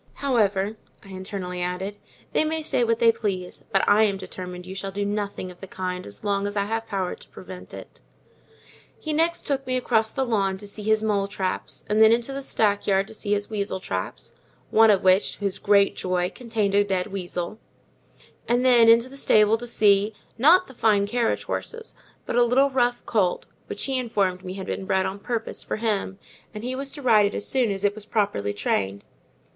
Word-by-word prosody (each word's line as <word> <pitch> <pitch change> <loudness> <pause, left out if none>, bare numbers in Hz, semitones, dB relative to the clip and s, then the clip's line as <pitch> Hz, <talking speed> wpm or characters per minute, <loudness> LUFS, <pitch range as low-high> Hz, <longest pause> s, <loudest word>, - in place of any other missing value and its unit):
However," 215 -6 +1 0.3
I - - -13
internally 185 -1 -5
added, 185 +3 -3 0.4
"they - - +3
may 315 0 -1
say 250 - +1
what 230 -1 +2
they 230 0 +5
please, 190 -5 -4
but 195 - +2
I 205 +1 +5
am 200 -2 0
determined 180 -1 -8
you 185 - -7
shall 195 0 -4
do 200 +1 -3
nothing 200 -2 -3
of 180 - -17
the 195 - -8
kind, 185 -1 -5
as 100 0 -12
long 200 -1 0
as 205 - -5
I 200 -1 +1
have 225 +2 -3
power 190 -3 -2
to - - -12
prevent 185 -1 -10
it." - - -11 1.0
He 310 - -4
next 330 +2 +1
took 270 -2 -1
me 255 0 +1
across 225 -3 +1
the 265 -1 -1
lawn 195 -5 0
to 205 - -10
see 205 +1 -8
his 220 +1 +1
mole 205 -2 +1
traps, 190 -2 -4
and 210 +1 +2
then 220 0 +8
into 235 +3 +1
the 275 - -4
stack 210 -6 0
yard 195 0 +2
to - - -10
see 205 -1 -2
his 205 +1 -2
weasel 200 -2 -2
traps: 95 - -5 0.4
one 225 0 +6
of 200 -2 +4
which, 185 +1 +4
to - - -16
his 200 0 -1
great 200 -1 +3
joy, 180 0 -1
contained 225 -5 -2
a 205 0 +5
dead 190 -2 -1
weasel; 180 +1 -4 0.9
and 245 +2 +2
then 240 -3 +6
into 230 +2 +6
the 275 +1 -12
stable 215 -4 +4
to 240 - -6
see, 205 -2 +3 0.2
not 340 +10 +5
the 265 - -14
fine 215 -4 +2
carriage 235 +2 0
horses, 460 0 -5 0.3
but - - -3
a 245 - +5
little 265 +4 +3
rough 245 -2 +1
colt, 190 -6 0 0.2
which - - -3
he 265 -1 0
informed 195 -6 -1
me 185 0 -6
had 190 -1 -6
been 190 - -4
bred 190 -1 +1
on 195 +1 -4
purpose 225 +1 -3
for - - -3
him, 210 -3 -2 0.4
and 210 - -6
he 250 +1 -3
was 275 +1 -4
to 285 0 -8
ride 215 -4 +5
it 200 - -5
as 205 - -1
soon 255 -4 +2
as 195 0 -3
it 205 0 +2
was 215 0 -9
properly 200 - 0
trained. 100 -1 -2
205 Hz, 215 wpm, -24 LUFS, 190-235 Hz, 1.0 s, then